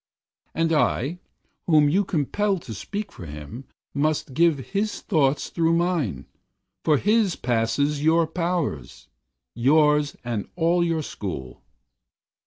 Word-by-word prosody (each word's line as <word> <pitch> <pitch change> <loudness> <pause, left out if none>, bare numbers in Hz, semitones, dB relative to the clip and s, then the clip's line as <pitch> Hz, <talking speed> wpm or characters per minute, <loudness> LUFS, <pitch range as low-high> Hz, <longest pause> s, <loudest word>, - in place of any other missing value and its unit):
And 165 0 +1
I, 150 +2 +1 0.5
whom 155 -3 +5
you 185 +8 +3
compel 195 +4 0
to 130 -9 -8
speak 205 - -5
for 85 - -10
him, 75 - -8 0.3
Must 145 -1 0
give 165 +1 +3
his 205 +2 -1
thought 145 -7 +2
through 165 -1 0
mine, 165 - 0 0.6
for 150 -2 +4
his 210 0 +2
Passes 125 +5 0
your 165 +1 +4
powers 165 - -3 0.4
yours 150 +3 +3
and 115 -4 -3
all 170 0 +2
your 165 -2 0
school. 65 - -6
155 Hz, 120 wpm, -24 LUFS, 125-170 Hz, 0.6 s, whom